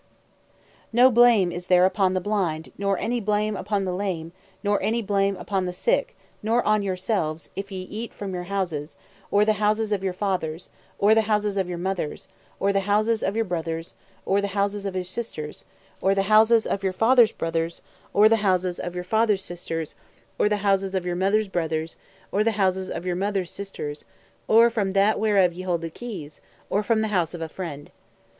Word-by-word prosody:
P: - - -34 0.3
No 250 +3 +6
blame 235 -6 +5
is 175 +1 -6
there 180 0 +5
upon 190 -1 +2
the - - +2
blind 180 -5 -2
nor 200 -1 0
any 240 +1 -1
blame 210 0 0
upon 200 0 -1
the 180 - -2
lame 180 -4 -3 0.3
nor 205 0 +1
any 220 +4 +1
blame 200 -2 0
upon 185 0 -2
the - - -2
sick - - 0 0.2
nor 230 +3 +1
on 215 0 +2
yourselves 185 -4 -2
if 200 +1 -5
ye 185 -1 -5
eat 220 +5 -6
from 195 -2 -6
your 180 -1 -4
houses, 175 -6 -3 0.3
or 205 +1 +4
the 215 -1 +1
houses 215 +1 +1
of 200 -2 0
your 190 - 0
fathers, 180 -4 -3 0.3
or 205 +2 +5
the 220 -1 +2
houses 210 -1 +1
of 190 -2 -1
your 175 - -3
mothers, 180 -3 -3 0.3
or 200 0 +2
the 195 - +3
houses 215 +3 +1
of 195 - -1
your 225 0 +1
brothers, 165 -2 -4 0.3
or 200 +1 +2
the 200 - -1
houses 200 0 -1
of 190 - -5
your 185 - -1
sisters, 180 -6 -6 0.4
or 195 +1 +3
the 195 - +2
houses 220 +2 +5
of 195 - -2
your 190 -1 0
fathers' 230 +2 +5
brothers, 165 0 -3 0.3
or 210 +1 +6
the 225 +1 +4
houses 185 -3 0
of 175 0 -5
your 180 - -3
fathers' 210 0 +1
sisters, 165 -2 -5 0.5
or 210 - +3
the 210 - +1
houses 195 -1 +1
of 185 -2 -1
your 175 -1 -1
mothers' 200 +4 +2
brothers, 160 -3 -2 0.4
or 205 - +2
the 225 0 +1
houses 190 -2 0
of 175 - -5
your 180 -1 -1
mothers' 195 -1 -1
sisters, 155 -7 -6 0.4
or 230 +2 +7
(from 200 -4 -1
that) 200 +2 +3
whereof 200 -5 +3
ye 180 - -7
hold 175 -2 -1
the 165 -1 -5
keys, 175 -10 -8 0.3
or 205 - +2
(from 220 +1 +1
the 220 - -1
house) 180 -4 0
of 170 - -8
a - - -3
friend. 155 -4 -7
195 Hz, 205 wpm, -24 LUFS, 180-210 Hz, 0.5 s, or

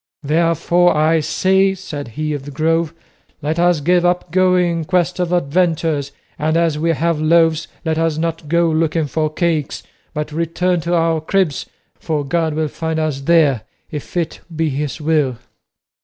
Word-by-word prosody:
"Therefore, 165 +2 +2
I 160 +2 +3
say," 190 +5 +2
said 150 -7 -7
he 155 0 -1
of 140 -2 -5
the - - -7
Grove, 160 +2 0 0.5
"let 155 +3 -1
us 175 -3 +3
give 175 +3 +3
up 175 -1 0
going 180 -2 +2
in 160 - -4
quest 180 0 0
of 175 -1 -1
adventures, 160 -3 0 0.3
and 155 +2 +1
as 165 -3 +1
we 165 +2 0
have 165 +1 0
loaves 160 0 +3 0.2
let 160 0 0
us 165 -2 0
not 165 -1 -3
go 170 +1 +3
looking 160 0 +1
for 155 +1 -1
cakes, 155 -3 -1 0.3
but 150 0 -4
return 170 +2 0
to 170 +2 0
our 165 -1 +1
cribs, 170 -3 0 0.3
for 150 -3 -2
God 160 +1 0
will 155 0 0
find 160 +1 -3
us 155 -3 -1
there 145 -6 +3 0.3
if 150 +3 -6
it 165 -2 -2 0.2
be 160 0 0
his 145 +2 -3
will." 150 -5 +1
160 Hz, 170 wpm, -18 LUFS, 150-170 Hz, 0.5 s, I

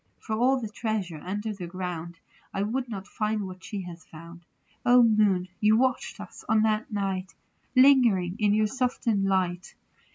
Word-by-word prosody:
For 220 - -3
all 255 +4 +3
the 225 - -4
treasure 205 -7 -3
under 205 +4 -3
the 185 -4 -7
ground 175 -2 -5 0.4
I 195 - 0
would 245 +4 -2
not 195 -4 -6
find 215 -1 -2
what 185 0 -9
she 205 -3 -5
has 175 -2 -9
found. 170 +2 -13 0.4
0 245 0 +6
Moon, 210 -5 +3
you 215 +1 +4
watched 260 +2 0
us - - -10
on 220 -1 +4
that 220 +1 0
night, 195 -2 -3 0.4
Lingering 240 -9 +5
in 210 -1 +3
your 215 0 +3
softened 235 -3 0
light. 185 -1 -1
205 Hz, 165 wpm, -27 LUFS, 185-220 Hz, 0.4 s, 0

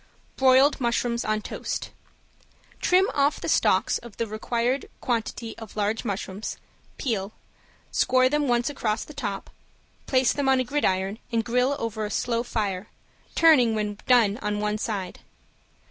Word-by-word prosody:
~BROILED 265 +2 +5
MUSHROOMS 235 0 0
ON 215 0 -1
TOAST~ - - -4 0.9
Trim 370 +1 +4
off 285 +1 +2
the - - -5
stalks - - +2
of 235 -3 -13
the 230 - 0
required 235 +4 -1
quantity 230 -1 -3
of 225 -3 -10
large 210 +1 -1
mushrooms, 200 -1 -4 0.4
peel, 215 -5 -2 0.6
score 255 0 +3
them 295 +1 +1
once 240 -1 +2
across 225 -6 -1
the 300 - -11
top, 205 -9 -5 0.6
place 260 -2 +3
them 280 -2 0
on 265 -1 +4
a - - +2
gridiron 200 -7 0
and 230 -1 0
grill 250 +3 +2
over 225 -4 -3
a 210 - -2
slow 235 +1 0
fire, 210 -5 -2 0.5
turning 260 -9 +5
when 210 -1 -2
done 235 -4 +4
on 210 0 -1
one 210 0 -1
side. 200 -5 -4
235 Hz, 145 wpm, -25 LUFS, 210-255 Hz, 0.9 s, ~BROILED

